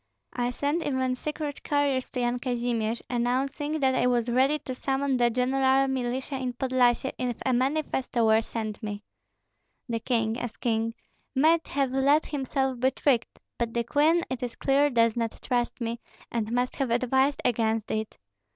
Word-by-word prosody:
I 245 0 0
sent 290 +6 -1
even 260 -3 0
secret 300 +1 -4
couriers 285 -3 0
to 250 - -3
Yan 240 0 0
Kazimir, 240 -3 -1
announcing 270 +5 -1
that 265 -1 +3
I 250 -1 +2
was 240 -1 +1
ready 265 +5 +3
to 260 - -6
summon 270 +1 0
the 240 -1 +3
general 265 +2 +2
militia 260 +1 -2
in 255 -1 -3
Podlyasye 255 0 +2
if 245 -2 -2
a 260 - +2
manifesto 260 -2 0
were 220 0 +5
sent 220 -1 -5
me. 205 -2 -5 0.8
The 230 -2 -1
king, 225 -1 0
as 240 -2 -5
king, 225 -1 -1 0.4
might 320 +4 +4
have 275 -2 0
let 280 +3 +3
himself 265 -2 -1
be 260 +2 +4
tricked; 265 -3 0 0.2
but 235 -1 -2
the 235 - +1
queen 310 +7 +3
it 255 -2 -4
is 245 -2 -4
clear 280 +1 +3
does 230 -3 +3
not 230 -2 -2
trust 245 -1 -1
me, 235 0 -3 0.3
and 225 -2 -2
must 245 +1 0
have 270 -3 0
advised 265 +4 +2
against 225 -2 +1
it. 220 0 -3
250 Hz, 170 wpm, -27 LUFS, 235-270 Hz, 0.8 s, were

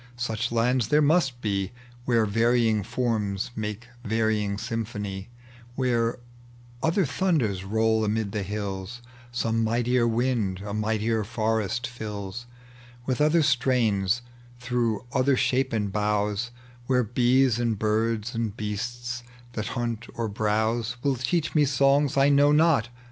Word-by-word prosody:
Such 115 -1 -2
lands 120 0 +2
there 150 +5 +4
must 145 -5 +2
be, 100 -2 -1 0.3
Where 115 -3 +3
varying 115 0 +2
forms 105 -2 -1
make 110 +2 -4 0.2
varying 110 -2 0
symphony 105 -3 -4 0.2
— 120 0 -22
Where 120 -3 +1 0.6
other 170 +3 +2
thunders 125 - 0
roll 110 +2 +1
amid 105 -1 -1
the 105 0 -2
hills, 100 +3 -5 0.3
Some 115 -1 0
mightier 120 +2 +2
wind 115 -5 0
a 100 - -4
mightier 110 +1 0
forest 110 0 -1
fills 110 -1 -6 0.6
With 130 +2 -1
other 155 +2 +4
strains 120 -5 +2 0.4
through 120 -2 -1
other 130 0 +3
shapen 120 -7 +1
bougbs; 105 +2 0 0.4
Where 125 -1 +3
bees 125 +1 +3
and 115 -3 0
birds 110 +2 0
and 115 -3 -3
beasts 120 +3 -4 0.3
that 105 -2 -3
hunt 120 -1 -3
or 115 -1 -2
browse 110 +3 0
Will 140 -2 +2
teach 140 +6 -1
me 150 - +4
songs 140 +1 +3
I 135 +1 +5
know 145 +1 +5
not. 150 -6 +4
115 Hz, 130 wpm, -26 LUFS, 105-125 Hz, 0.6 s, I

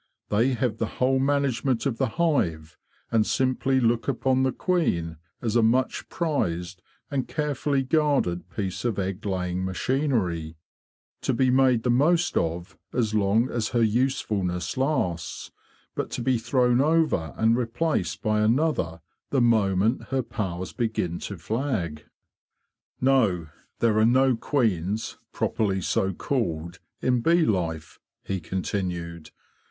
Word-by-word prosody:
They 115 +6 +2
have 115 -2 -1
the 115 - 0
whole 130 +1 +2
manage 140 -2 +1
ment 130 -3 0
of 130 -5 -1
the - - +2
hive, 85 - 0 0.4
and 115 -2 +4
simply 130 +2 +1
look 115 -1 +1
upon 130 -1 +1
the 130 0 +2
queen 85 - 0 0.3
as 115 -1 -1
a 120 - +5
much 125 +4 +1
prized 90 - -2 0.3
and 135 -2 -1
carefully 145 -2 -1
guarded 140 - +1
piece 95 -3 -4
of 120 -5 -1
egg 95 +1 -3
laying 90 -1 -2
machinery, 95 - -1 0.6
to 130 - 0
be 130 +1 +3
made 130 -3 +3
the 125 - +2
most 165 +8 +2
of 85 +2 -2
as 115 -3 0
long 110 +4 +2
as 115 -2 -1
her 115 - +4
usefulness 105 -6 0
lasts, 130 - -2 0.4
but - - -3
to 120 - -4
be 130 -2 +2
thrown 125 +1 +2
over 155 - +1
and 115 +1 +3
replaced 125 +8 -1
by 110 -2 +2
another 110 - +1 0.3
the 135 - +1
moment 110 -1 +2
her 135 -1 -1
powers 95 -5 -4
begin 110 -8 -2
to 100 - -6
flag." 95 - -3 0.5
'* - - -54
No; 110 - +2 0.3
there 110 -2 +2
are 110 - +5
no 130 +1 +4
queens, 110 - -1
properly 100 -3 0
so 95 +1 0
called, 85 - -2 0.2
in 125 -2 +2
bee 165 +5 +4
life,"' 85 -5 -2 0.2
he 95 -1 -3
continued. 85 -2 -4
115 Hz, 140 wpm, -25 LUFS, 90-130 Hz, 0.6 s, a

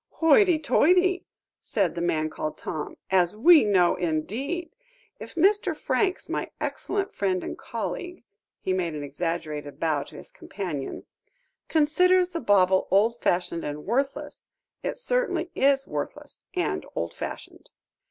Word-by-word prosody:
"Hoity, 335 +2 +5
toity!" 360 +4 +3 0.3
said - - 0
the 170 - -4
man 160 -3 +1
called 155 0 -4
Tom; 155 -3 -5
"as 180 0 +3
we 315 +7 +7
know, 190 -4 +3
indeed. 220 - -2 0.5
If - - -9
Mr. 400 +5 +3
Franks, 380 -3 0
my - - -3
excellent 400 0 -2
friend 185 -2 0
and - - -5
colleague," 355 -4 -5 0.4
he 185 - -1
made 175 -4 -1
an 145 - -5
exaggerated 150 -1 -4
bow 155 -3 +1
to 140 - -11
his - - -11
companion, 170 -9 -6 0.6
"considers 360 +4 +3
the 335 - -3
bauble 190 -4 +3
old 225 +4 +3
fashioned 175 -1 0
and 150 0 -5
worthless, 270 +6 -2 0.3
it - - -3
certainly - - -1
is 275 0 +2
worthless - - -6
and 360 - -1
old - - -2
fashioned." - - -8
210 Hz, 135 wpm, -26 LUFS, -, 0.6 s, we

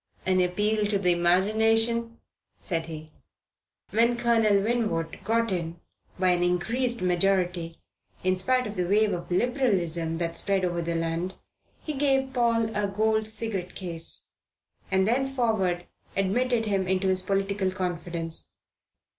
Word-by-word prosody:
"An 185 -1 +3
appeal 210 +4 +1
to 205 -1 +1
the 180 -2 +2
imagination," 220 +6 +2 0.4
said 165 -4 -3
he. 155 -1 -8 0.8
When 235 +2 +3
Colonel 225 -4 +3
Winwood 210 -8 -1
got 230 0 +1
in 170 -2 -3 0.4
by 185 0 +2
an 175 -1 +2
increased 230 +7 0
majority, 180 -2 +1 0.5
in 185 0 +2
spite 250 +7 +1
of 210 -2 -6
the 180 -1 0
wave 210 +1 +3
of 175 -1 -5
Liberalism 180 - 0
that 165 0 -2
spread 195 0 0
over 175 -1 -1
the 170 0 -2
land, 165 +3 -2 0.5
he 305 - -3
gave 270 -2 +1
Paul 230 -2 +1
a 205 -1 +1
gold 220 +2 +1
cigarette 215 -4 -3
case; 170 -3 -3 0.6
and 190 0 +2
thenceforward 225 -8 +1 0.3
admitted 225 +4 +1
him 195 -3 0
into 190 +1 +1
his 185 0 +2
political 195 0 0
confidence. 175 -3 -4
195 Hz, 135 wpm, -27 LUFS, 175-225 Hz, 0.8 s, An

